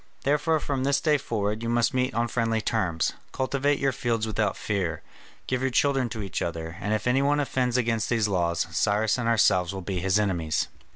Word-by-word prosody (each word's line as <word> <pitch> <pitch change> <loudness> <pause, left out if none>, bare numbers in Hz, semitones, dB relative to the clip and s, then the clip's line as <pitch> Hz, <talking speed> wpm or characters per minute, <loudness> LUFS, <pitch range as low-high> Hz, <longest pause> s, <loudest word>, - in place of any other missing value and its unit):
Therefore 150 +3 +2
from 140 -3 -2
this 140 +1 +2
day 150 -2 +2
forwards 105 -2 -2
you 115 - -2
must 120 +3 +2
meet 130 -2 0
on 120 +1 +1
friendly 115 -1 0
terms, 95 -8 0 0.2
cultivate 140 +2 0
your 135 0 +1
fields 115 -3 -1
without 105 -2 -1
fear, 100 -5 -2 0.4
give 130 0 -1
your 130 - +1
children 135 -1 +2
to 110 -2 -5
each 95 - -4
other, 80 -1 -4
and 105 - -2
if 110 - -4
any 125 +2 +3
one 145 +1 +2
offends 130 -3 0
against 115 -2 0
these 115 -3 +2
laws, 85 -4 0
Cyrus 105 +6 +1
and 120 - -1
ourselves 95 -4 +3
will 95 - -5
be 95 0 -3
his 95 +2 +2
enemies." 85 -7 0
115 Hz, 205 wpm, -26 LUFS, 100-130 Hz, 0.4 s, any